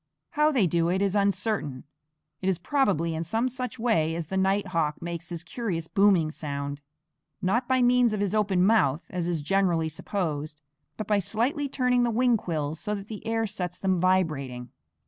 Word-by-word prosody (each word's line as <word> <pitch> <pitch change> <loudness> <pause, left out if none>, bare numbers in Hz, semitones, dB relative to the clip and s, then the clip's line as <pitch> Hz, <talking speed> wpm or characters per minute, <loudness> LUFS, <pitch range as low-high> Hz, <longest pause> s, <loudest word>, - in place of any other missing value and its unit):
How 300 0 +3
they 250 -9 +3
do 170 0 +1
it 185 +2 +1
is 200 0 +1
uncertain; 200 - 0 0.6
it 190 - 0
is 185 - +1
probably 180 - +1
in 160 +1 -2
some 225 +9 0
such 255 0 -5
way 165 -9 +1
as 170 -1 -3
the 190 - -3
night 195 +1 +1
hawk 160 -4 0
makes 170 0 -6
his 170 -1 -4
curious 170 -4 -3
booming 190 -6 +3
sound, 140 -2 -5 0.6
not 235 +7 0
by 260 -1 +3
means 245 -1 +4
of 215 - -2
his 205 -1 -1
open 195 -4 +2
mouth, 165 -9 +3
as 180 -2 -2
is 165 -4 -2
generally 175 -2 +1
supposed, 155 -3 -4 0.4
but 215 - -4
by 210 0 +2
slightly 255 - -1
turning 250 -2 +2
the 240 - +2
wing 240 +1 +3
quills 160 -6 -3
so 210 - -2
that 200 0 -8
the 215 -2 -7
air 225 0 0
sets 180 -4 -4
them 190 -2 0
vibrating. 150 -10 0
190 Hz, 185 wpm, -27 LUFS, 165-220 Hz, 0.6 s, means